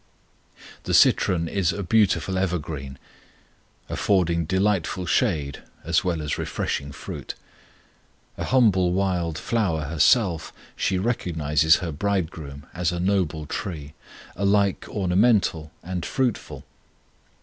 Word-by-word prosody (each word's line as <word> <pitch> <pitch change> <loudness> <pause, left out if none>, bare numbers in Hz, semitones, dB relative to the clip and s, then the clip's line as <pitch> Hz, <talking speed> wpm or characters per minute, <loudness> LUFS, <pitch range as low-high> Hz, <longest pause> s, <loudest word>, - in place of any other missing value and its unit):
The - - +1
citron 85 -3 +4
is 95 0 +1
a 100 - -4
beautiful 95 0 +2
evergreen, 80 -7 -3 0.9
affording 85 -4 +1
delightful 95 0 0
shade 80 - 0 0.2
as 85 0 +1
well 85 -4 -1
as 75 - -2
refreshing 70 +1 -3
fruit. - - -7 1.0
A - - -4
humble 100 -8 +3
wild 90 -4 0
flower 95 -9 0
herself, 80 - +2 0.2
she 95 - 0
recognizes 80 - +2
her 80 - -3
Bridegroom 80 -5 -3
as 90 -1 0
a 90 - -3
noble 90 -5 0
tree, 75 -2 -5 0.4
alike 100 0 +1
ornamental 95 -5 +2
and 90 0 -4
fruitful. 125 +3 -2
90 Hz, 105 wpm, -24 LUFS, 80-100 Hz, 1.0 s, citron